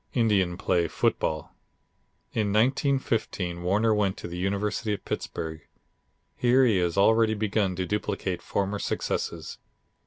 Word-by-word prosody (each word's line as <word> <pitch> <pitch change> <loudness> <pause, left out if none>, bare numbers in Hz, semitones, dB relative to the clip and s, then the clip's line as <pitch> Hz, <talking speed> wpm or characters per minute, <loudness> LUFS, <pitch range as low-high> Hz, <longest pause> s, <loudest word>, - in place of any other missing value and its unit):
Indian 100 -7 +2
play 85 -3 +1
football." 80 -1 -1 0.8
In 105 -2 0
1915 115 - 0
Warner 105 +5 +2
went 100 -3 +1
to - - -6
the 85 +1 -6
University 105 +3 -1
of - - -13
Pittsburgh. 80 -1 -4 0.7
Here 125 +2 +4
he 110 -5 +3
has 85 0 0
already 110 +2 +4
begun 105 -3 0
to 90 0 -2
duplicate 95 -2 -2
former 100 +1 -2
successes. - - -3
100 Hz, 125 wpm, -27 LUFS, 90-110 Hz, 0.8 s, Here